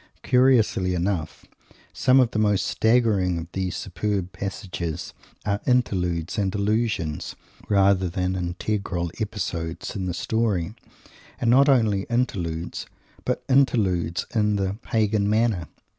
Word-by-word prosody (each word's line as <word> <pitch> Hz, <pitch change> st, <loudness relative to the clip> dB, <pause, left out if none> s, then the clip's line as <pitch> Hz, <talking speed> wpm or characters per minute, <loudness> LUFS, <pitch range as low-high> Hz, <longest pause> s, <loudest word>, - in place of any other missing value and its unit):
Curiously 115 Hz, -8 st, +3 dB
enough, 90 Hz, -2 st, -2 dB, 0.5 s
some 130 Hz, +1 st, +4 dB
of 125 Hz, -3 st, +3 dB
the 110 Hz, -, -1 dB
most 105 Hz, -3 st, +2 dB
staggering 110 Hz, -6 st, +2 dB
of 85 Hz, +1 st, -7 dB
these 95 Hz, -1 st, -2 dB
superb 95 Hz, -1 st, -2 dB
passages 90 Hz, -4 st, -5 dB, 0.3 s
are 100 Hz, 0 st, 0 dB
interludes 90 Hz, -7 st, 0 dB
and 95 Hz, -1 st, 0 dB
allusions, 105 Hz, -7 st, -1 dB, 0.3 s
rather 95 Hz, -2 st, +3 dB
than 90 Hz, +2 st, -1 dB
integral 90 Hz, -1 st, -2 dB
episodes 85 Hz, -6 st, -4 dB
in 95 Hz, -2 st, -3 dB
the 90 Hz, -, -2 dB
story, 105 Hz, -1 st, 0 dB, 0.7 s
and 120 Hz, -, +2 dB
not 140 Hz, +3 st, +6 dB
only 110 Hz, -7 st, +3 dB
interludes, 90 Hz, -9 st, -2 dB, 0.4 s
but -, -, -1 dB
interludes 95 Hz, -, +2 dB
in 105 Hz, -2 st, +2 dB
the 95 Hz, -1 st, 0 dB
"pagan 105 Hz, -2 st, +1 dB
manner." 110 Hz, -6 st, +1 dB
100 Hz, 120 wpm, -24 LUFS, 90-110 Hz, 0.7 s, not